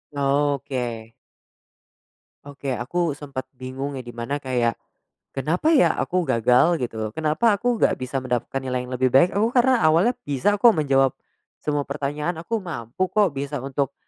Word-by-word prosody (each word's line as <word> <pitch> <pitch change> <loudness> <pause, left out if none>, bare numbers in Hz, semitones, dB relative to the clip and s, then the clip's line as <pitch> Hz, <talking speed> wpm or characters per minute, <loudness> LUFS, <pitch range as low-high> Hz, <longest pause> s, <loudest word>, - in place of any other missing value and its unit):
Oke. 135 -5 -1 1.3
Oke. 140 -1 -7
Aku 155 +4 -1
sempet 135 -3 -6
bingung 135 +2 -5
ya 130 - -6
di 120 - -9
mana 120 +5 -3
kayak, 125 -4 -1 0.6
"Kenapa 170 - +1
ya 280 - +5
aku 180 -1 0
gagal?" 125 +7 +3
Gitu, 110 -3 -3
"Kenapa 160 +8 +2
aku 245 +3 0
nggak - - +3
bisa 130 +1 -3
mendapatkan 125 +1 -2
nilai 125 -1 -2
yang 125 - -7
lebih 130 0 +2
baik?" 135 +7 +6
Aku 215 +3 +2
karena 255 -1 +4
awalnya 170 +10 +4
bisa 145 +8 +1
kok 235 +1 +7
menjawab 135 -4 +3 0.5
semua 145 -1 0
pertanyaan, 150 +4 -3
aku 225 +5 -2
mampu 170 - -3
kok, 205 -7 +2
bisa 140 +1 -3
untuk, 135 0 -2
140 Hz, 155 wpm, -23 LUFS, 130-170 Hz, 1.3 s, kok